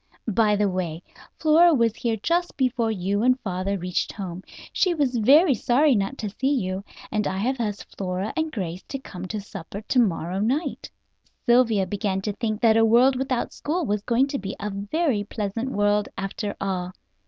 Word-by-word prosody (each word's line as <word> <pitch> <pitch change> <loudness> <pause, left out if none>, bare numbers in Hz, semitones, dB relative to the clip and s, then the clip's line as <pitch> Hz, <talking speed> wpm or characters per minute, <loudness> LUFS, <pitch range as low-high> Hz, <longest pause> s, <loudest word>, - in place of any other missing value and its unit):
By 215 -1 +3
the 205 0 +2
way, 180 -3 -3 0.3
Flora 325 +1 +5
was 230 -3 +2
here 230 -2 -1
just 345 +1 0
before 250 -4 +1
you 200 0 -1
and 255 +2 +4
your - - -25
father 190 0 -2
reached 180 -1 -2
home; 185 -3 -6 0.3
she 365 -3 +2
was 270 -5 +1
very 285 - +6
sorry 260 +6 +3
not 200 +4 -1
to 215 - -3
see 270 +1 +3
you, 190 -4 -2 0.3
and 210 -2 0
I 190 - -2
have 255 +6 -1
asked 210 -3 -4
Flora 185 +1 -3
and 320 -1 -1
Grace 185 - -4
to 275 - -4
come 185 -8 -8
to 215 +2 -4
supper 195 -1 -8
to 250 +4 +1
morrow 185 -4 0
night." 260 - -1 0.6
Sylvia 235 -5 +4
began 195 0 -2
to 210 +1 -2
think 215 0 -3
that 225 -2 +5
a 225 - +5
world 240 +4 +5
without 255 -1 -2
school 330 +3 -2
was 210 -3 -1
going 240 +5 +2
to 275 - -2
be 195 0 -5
a 210 +1 -3
very 205 - -1
pleasant 210 +4 -3
world 205 -2 +1
after 200 +1 -4
all. 185 -2 -3
215 Hz, 190 wpm, -24 LUFS, 195-255 Hz, 0.6 s, very